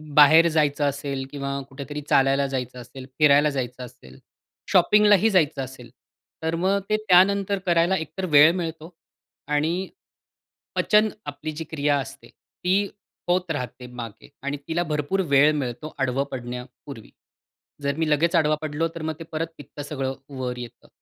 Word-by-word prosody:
बाहेर 155 +3 +8
जायचं 145 -1 +2
असेल 140 -1 -4
किंवा 140 -1 -3
कुठेतरी 140 +2 -7
चालायला 135 +1 +3
जायचं 125 -2 -4
असेल, 125 +2 -10
फिरायला 150 0 +5
जायचं 125 -2 -4
असेल, 65 - -16 0.5
शॉपिंगलाही 210 0 +5
जायचं 160 -8 +2
असेल. 125 -2 -10 0.5
तर 160 +1 0
मग 195 +1 +2
ते 215 - +3
त्यानंतर 195 +2 +4
करायला 175 +1 +3
एकतर 160 +4 -5
वेळ 150 +3 +9
मिळतो 165 -1 -5 0.5
आणि 160 +6 0 0.9
पचन 215 0 +3 0.2
आपली 155 - -5
जी 155 +1 -6
क्रिया 145 -1 +1
असते 130 - -8
ती 190 +3 -2 0.4
होत 180 -1 +1
राहते 125 -3 -5
मागे 115 -3 -10
आणि 140 +1 -2
तिला 170 +2 0
भरपूर 150 +6 0
वेळ 145 +2 +6
मिळतो 130 +2 -5
आडवं 135 0 0
पडण्यापूर्वी. 125 0 -8 0.7
जर 140 0 0
मी 160 -1 0
लगेच 160 +3 +2
आडवा 155 -1 +3
पडलो 155 +1 -1
तर 165 - -6
मग 160 0 -2
ते - - -6
परत 160 +1 -2
पित्तं 145 +1 -10
सगळं 135 -2 -3 0.3
वर 125 -1 -3
येतं. 120 -2 -10
150 Hz, 150 wpm, -24 LUFS, 135-165 Hz, 0.9 s, वेळ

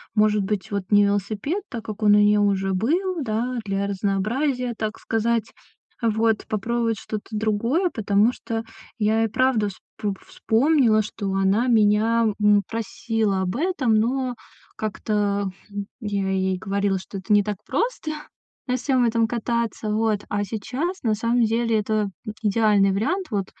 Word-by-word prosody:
Может 210 -1 +3
быть, 200 0 -3
вот, 200 -1 -1
не 205 -1 +6
велосипед, 205 - -1
так 230 -4 -6
как 215 -1 -7
он 205 -1 +6
у - - +5
неё 210 0 +4
уже 195 -1 +1
был, 335 - 0
да, 245 +1 -2
для 195 0 -1
разнообразия, 235 +7 -1
так 215 0 -3
сказать. 225 0 0 0.5
Вот, 225 -1 +1
попробовать 230 +1 0
что-то 215 -1 -6
другое, 225 - +1
потому 215 -1 +2
что 225 -2 -4 0.4
я 220 +1 +2
и - - +2
правда 245 -3 +2
вспо 200 +1 -6
вспомнила, 235 -2 +3
что 205 -1 -4
она 195 +5 +2
меня, 225 0 +3 0.2
м, 210 -1 +5
просила 225 -2 -1
об 185 0 -2
этом, 295 -6 +1
но 250 +3 0 0.4
как-то 205 -2 -1 0.5
я 200 -3 -2
ей 190 -1 0
говорила, 200 0 0
что 195 - -8
это 190 +3 -3
не 205 0 +6
так 205 0 -3
просто 460 -10 -1 0.6
на 250 - +1
всем 255 -1 +2
этом 230 -1 +2
кататься. 235 -1 -2
Вот, 215 -1 +1
а 205 0 0
сейчас 250 - -3
на 220 -3 +1
самом 230 +3 +1
деле 230 0 +1
это 210 -1 0 0.3
идеальный 210 -2 +3
вариант, 360 - -1
вот, 200 -3 0
215 Hz, 150 wpm, -23 LUFS, 205-235 Hz, 0.6 s, не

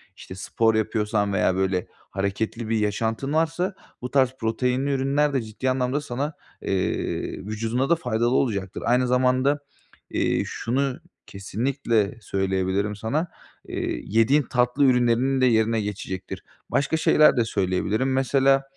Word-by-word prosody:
işte, 95 - -10
spor 110 +3 +1
yapıyorsan 105 -1 0
veya, 95 -1 +2
böyle, 95 -1 0
hareketli 105 +4 -4
bir 115 -1 +1
yaşantın 110 +6 -1
varsa 165 +4 0 0.3
bu 125 - -5
tarz 130 -2 +3
proteinli 125 +4 0
ürünler 140 +2 +1
de 135 - +1
ciddi 110 +4 -3
anlamda 130 +2 0
sana, 145 +2 -3 0.3
eee, 95 -1 -2
vücuduna 115 +5 -1
da 170 - +5
faydalı 120 -6 0
olacaktır. 100 -7 -1
Aynı 125 +1 +3
zamanda, 130 +3 +2 0.5
eee, - - +1
şunu 130 +3 -2 0.3
kesinlikle 115 +1 -1
söyleyebilirim 95 +1 -1
sana, 140 - -1 0.4
eee, - - -3
yediğin 115 +7 +3
tatlı 125 +3 +1
ürünlerinin 125 +1 +3
de - - +5
yerine 115 -2 +2
geçecektir. 95 -2 -5 0.3
Başka 140 +4 +1
şeyler 155 -3 +5
de 120 - +3
söyleyebilirim 105 +6 0
mesela, 135 +1 +3
120 Hz, 130 wpm, -24 LUFS, 105-135 Hz, 0.5 s, da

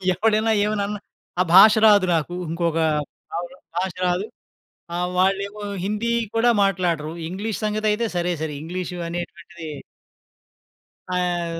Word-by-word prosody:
ఎవడైనా 220 +3 +2
ఏమైనా 210 -1 0
అన్నా 210 0 -4 0.4
ఆ - - +5
భాష 210 +3 +10
రాదు 205 -3 +6
నాకు. 165 +2 -1 0.2
ఇంకొక 170 0 -1 0.6
అవును. 175 +1 -6 0.2
భాష 185 0 -1
రాదు. 180 +3 0 0.7
ఆహ్, 180 +1 -1
వాళ్ళేమో 200 +2 0 0.2
హిందీ 210 +3 -1 0.2
కూడా 230 +2 +4
మాట్లాడరు. 170 -5 0 0.2
ఇంగ్లీష్ 205 +4 -4
సంగతి 215 0 0
అయితే 230 +2 0
సరే 175 0 0
సరి. 155 -2 -3
ఇంగ్లీష్ 180 +3 -5
అనేటువంటిది 170 0 -7 1.5
ఆహ్, 175 -2 -1
185 Hz, 125 wpm, -23 LUFS, 175-210 Hz, 1.5 s, భాష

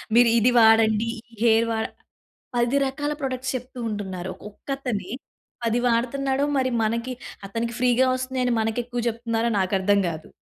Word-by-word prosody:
మీరు 240 0 +7
ఇది 240 +3 +4
వాడండి, 220 0 +5 0.2
ఈ - - -21
హెయిర్ 230 0 +4
వాడ 220 0 -1 0.7
10 240 +3 +2
రకాల 290 +2 -2
ప్రొడక్ట్స్ 265 -1 -2
చెప్తూ 255 +1 -9
ఉంటున్నారు. 190 -4 -4 0.2
ఒక్క 205 - -28
అతనే 220 -9 -3 0.5
10 230 +1 +1
వాడుతున్నాడో 265 +3 +1
మరి 260 -1 +1
మనకి 235 +3 -1 0.4
అతనికి 230 +3 -3
ఫ్రీగా 250 +1 +4
వస్తున్నాయి 255 0 -2
అని 245 - +2
మనకి 220 +1 -1
ఎక్కువ 245 0 -4
చెప్తున్నారో 230 0 -1
నాకు 190 +1 0
అర్థం 200 +1 +3
కాదు. 160 -1 -6
235 Hz, 155 wpm, -24 LUFS, 220-255 Hz, 0.7 s, మీరు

